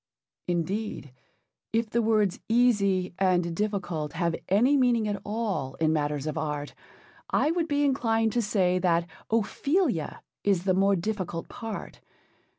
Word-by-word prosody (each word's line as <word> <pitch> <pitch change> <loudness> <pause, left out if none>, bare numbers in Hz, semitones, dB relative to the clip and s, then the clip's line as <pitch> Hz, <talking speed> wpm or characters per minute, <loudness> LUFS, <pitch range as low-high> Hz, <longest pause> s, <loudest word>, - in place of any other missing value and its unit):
Indeed, 180 - -2 0.6
if 225 -1 0
the 235 - +2
words 215 -4 +2
easy 200 -7 +3
and 175 -3 +2
difficult 185 -7 -2
have 170 -1 0
any 235 +9 +4
meaning 245 -5 +3
at 205 -1 -2
all 205 - -2
in 160 -1 +1
matters 150 -2 -1
of 155 +1 -2
art, 150 -2 -3 0.6
I 305 - +2
would 335 -1 0
be 290 -1 +1
inclined 225 -5 +1
to 240 - +2
say 185 -4 +1
that 170 -2 +2 0.2
Ophelia 230 - 0 0.2
is 195 -4 +2
the 190 -1 +2
more 195 +1 +3
difficult 180 -3 -3
part. 225 -3 -7
200 Hz, 140 wpm, -27 LUFS, 170-225 Hz, 0.6 s, any